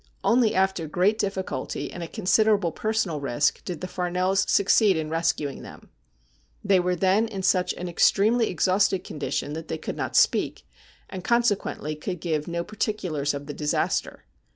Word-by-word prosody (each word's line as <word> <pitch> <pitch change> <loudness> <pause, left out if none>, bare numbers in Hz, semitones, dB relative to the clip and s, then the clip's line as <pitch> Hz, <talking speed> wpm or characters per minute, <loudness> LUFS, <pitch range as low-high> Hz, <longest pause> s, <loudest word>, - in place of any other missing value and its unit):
Only 235 -2 +3
after 190 -4 +1
great 190 +8 +1
difficulty 195 -2 -3
and 175 - -8
at 165 - -6
con 215 -5 -7
siderable 200 -2 +3
personal 215 -8 -1
risk 140 +2 0
did 175 -3 -5
the 185 - -4
Farnells 180 +2 0
succeed 200 -1 +4
in 155 -1 -3
rescuing 165 -4 -1
them. - - -12 0.7
They 195 -2 +4
were 180 0 0
then 195 +5 +2
in 200 -4 -5
svich 185 -1 +2
an 180 - -5
extremely 215 +6 +3
exhausted 185 +1 +1
con 150 - -8
dition 145 0 -2
that 160 +1 -6
they 160 - -3
could 155 - -6
not - - -3
speak, - - +2 0.4
and 185 -2 -7
consequently 205 -10 0
could 180 +4 -5
give 155 -3 -2
no 170 0 -2
particulars 175 -9 -2
of 140 0 -6
the 145 - -6
disaster. 150 +1 -1
180 Hz, 170 wpm, -25 LUFS, 160-200 Hz, 0.7 s, succeed